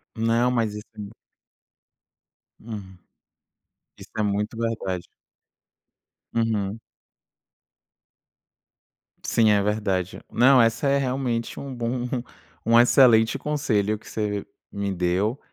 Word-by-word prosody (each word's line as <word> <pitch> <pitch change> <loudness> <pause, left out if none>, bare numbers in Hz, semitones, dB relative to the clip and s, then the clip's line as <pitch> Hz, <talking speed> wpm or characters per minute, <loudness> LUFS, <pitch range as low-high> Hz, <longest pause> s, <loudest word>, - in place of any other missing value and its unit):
Não, 115 +2 +2
mas 115 -4 0
assim. 105 -1 -9 1.5
Hum. 100 -5 -9 1.0
Isso - - -13
é 110 - +1
muito 105 +2 -1
verdade. 105 -6 -3 1.3
Uhum. 110 -2 0 2.4
Sim, 110 -2 +3
é 100 - +3
verdade. 100 -3 -1
Não, 130 +2 +6
essa 115 +4 +2
é 140 - +3
realmente 125 -3 -2
um 140 -1 -6
bom 120 +1 -2 0.6
um 115 +1 +6
excelente 120 -1 +5
conselho 125 -9 0
que - - -14
você 105 -2 -2 0.3
me 100 0 -3
deu, 95 +8 0
110 Hz, 95 wpm, -24 LUFS, 105-120 Hz, 2.4 s, Não